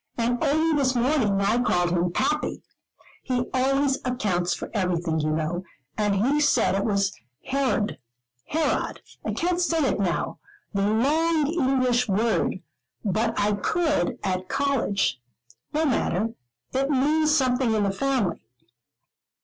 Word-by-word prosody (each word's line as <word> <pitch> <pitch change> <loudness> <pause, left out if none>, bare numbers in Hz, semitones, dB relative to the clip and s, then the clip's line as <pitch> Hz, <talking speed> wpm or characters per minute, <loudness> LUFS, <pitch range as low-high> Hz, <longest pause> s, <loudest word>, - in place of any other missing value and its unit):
And 240 +3 0
only 315 +2 +2
this 265 -2 +1
morning 240 -5 +2
I 215 +5 +2
called 175 -7 +1
him 175 0 +1
'pappy' 300 - -1 0.6
he 250 -2 -1
always 270 +1 +2
accounts 200 -9 0
for - - -7
everything, 175 -5 0
you 155 0 0
know; 160 +3 -1 0.3
and 205 -2 +1
he 290 +3 +2
said 295 - +3
it 195 +1 0
was 200 -2 +1 0.4
hered 260 -6 0 0.5
herod 320 +1 -1 0.2
I - - -2
can't 355 +1 0
say 340 -2 +1
it - - 0
now, 180 -4 -1 0.3
the 200 0 +1
long 305 +8 +2
English 255 -6 +1
word, 200 -2 0 0.4
but 220 +3 0
I 205 +1 +2
could 295 - 0
at 185 -1 -2
college 230 - 0 0.5
no 310 +2 +1
matter, 225 - 0 0.4
it 270 +1 0
means 300 +3 +2
something 255 -3 +2
in 210 - +1
the 200 - +1
family. 240 -2 -1
245 Hz, 135 wpm, -25 LUFS, 195-280 Hz, 0.6 s, said